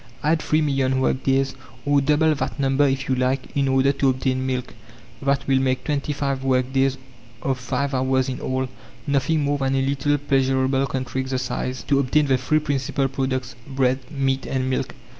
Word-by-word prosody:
Add 155 +1 +2
three 155 +1 +1
million 135 -3 +1
work 130 0 +1
days, 135 0 +1 0.3
or 145 0 +3
double 150 +3 +3
that 150 +1 -3
number 135 +1 +3
if 135 0 -1
you 130 - +1
like, 130 +1 -1
in 140 -1 +2
order 135 +1 +3
to 135 -1 +1
obtain 130 0 0
milk. 125 -1 -3 0.5
That 140 0 0
will 135 -1 +3
make 130 -1 0
twenty 150 0 -1
five 140 -2 -2
work 130 -1 +1
days 135 0 +2 0.5
of 135 -2 -1
five 135 +2 -2
hours 130 0 +1
in 130 -1 -4
all 130 0 -1 0.4
nothing 145 +2 +1
more 145 0 0
than 135 0 +1
a 135 0 +1
little 145 +1 +1
pleasureable 135 -1 +1
country 130 0 -2
exercise 130 -1 -3
to 140 - +2
obtain 145 +3 +2
the 130 -2 +2
three 155 +4 +1
principal 140 -2 0
products: 130 -1 -2 0.2
bread, 130 0 +2
meat, 135 -3 -1
and 130 -1 -1
milk. 130 0 -2
135 Hz, 185 wpm, -23 LUFS, 130-140 Hz, 0.5 s, or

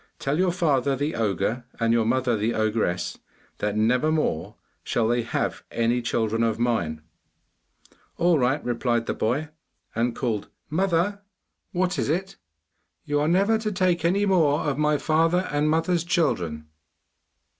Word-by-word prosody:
Tell 140 +4 -1
your 185 -1 +3
father 140 -6 +1
the 145 +4 -2
ogre 110 +3 -1 0.2
and 115 0 +2
your 115 -1 +2
mother 125 0 +1
the 110 +2 -1
ogress, 110 -5 -1 0.4
that 105 0 -1
never 125 +8 +2
more 100 - -1 0.3
shall 115 -2 0
they 120 +1 +2
have 115 - -2
any 115 +1 +1
children 115 -1 0
of 115 -1 +1
mine.' 85 -11 -1 1.1
'All 170 -2 +3
right,' 130 +4 +1
replied 120 -1 0
the - - -1
boy, 140 +8 -1 0.4
and 115 +1 0
called 115 -6 -2 0.2
'Mother!' 190 +3 +1 0.5
'What 180 0 0
is - - -1
it?' 190 +5 -2 0.7
'You 145 0 0
are 150 - +1
never 200 +6 +3
to 215 -1 -2
take 180 -3 +1
away 170 - +4
any 200 +3 +1
more 160 -7 +3
of 145 -1 -1
my 150 0 +3
father 165 +4 +2
and 145 +1 +1
mother's 165 +2 +1
children! 90 - 0
135 Hz, 155 wpm, -25 LUFS, 115-170 Hz, 1.1 s, away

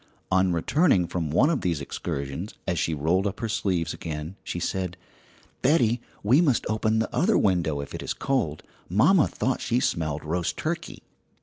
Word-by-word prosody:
On 95 0 +3
returning 95 - +3
from 85 -2 -3
one 130 - +4
of 155 - 0
these 85 -4 0
excursions, 70 +5 -5
as 90 -3 0
she 80 - 0
rolled 85 +7 +1
up 100 - -5
her 115 - -2
sleeves 90 -6 -1
again, 80 +2 -6
she 90 - -4
said: 90 0 -2 0.6
"Betty, 125 -5 +3 0.2
we 125 +10 +5
must 140 -9 +2
open 110 0 +1
the 110 - -1
other 205 +7 +3
window 85 -7 +1
if 70 - -8
it - - -5
is - - -2
cold. 120 - -1 0.3
Mamma 145 - +5
thought 130 0 -1
she 120 +1 +1
smelled 80 - -1
roast 85 +2 -1
turkey!" - - -4
95 Hz, 175 wpm, -26 LUFS, 80-120 Hz, 0.6 s, we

